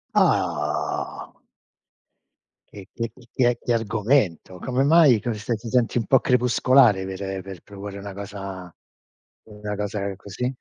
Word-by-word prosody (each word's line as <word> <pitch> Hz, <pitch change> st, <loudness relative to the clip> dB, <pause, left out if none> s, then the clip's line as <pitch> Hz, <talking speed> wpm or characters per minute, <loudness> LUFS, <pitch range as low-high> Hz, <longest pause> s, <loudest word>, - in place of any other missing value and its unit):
Ah. -, -, 0 dB, 1.4 s
E 100 Hz, -1 st, -11 dB
che 115 Hz, -1 st, -4 dB, 0.2 s
che 120 Hz, -1 st, +2 dB
che -, -, -1 dB
argomento. 105 Hz, -, 0 dB
Come 130 Hz, +7 st, 0 dB
mai, 145 Hz, -6 st, +6 dB
cos 110 Hz, -2 st, -4 dB
che 120 Hz, -, -1 dB
ti 115 Hz, +1 st, -8 dB
senti 125 Hz, 0 st, +2 dB
un 115 Hz, -, -3 dB
po' 130 Hz, -, +5 dB
crepuscolare 125 Hz, -4 st, +4 dB
per 95 Hz, 0 st, -5 dB
per 95 Hz, -2 st, -9 dB
proporre 100 Hz, 0 st, -9 dB
una 100 Hz, 0 st, -7 dB
cosa 95 Hz, -3 st, -7 dB, 0.7 s
una 105 Hz, -1 st, -6 dB
cosa 100 Hz, -1 st, -3 dB
così? 100 Hz, +6 st, -4 dB
105 Hz, 130 wpm, -24 LUFS, 100-120 Hz, 1.4 s, mai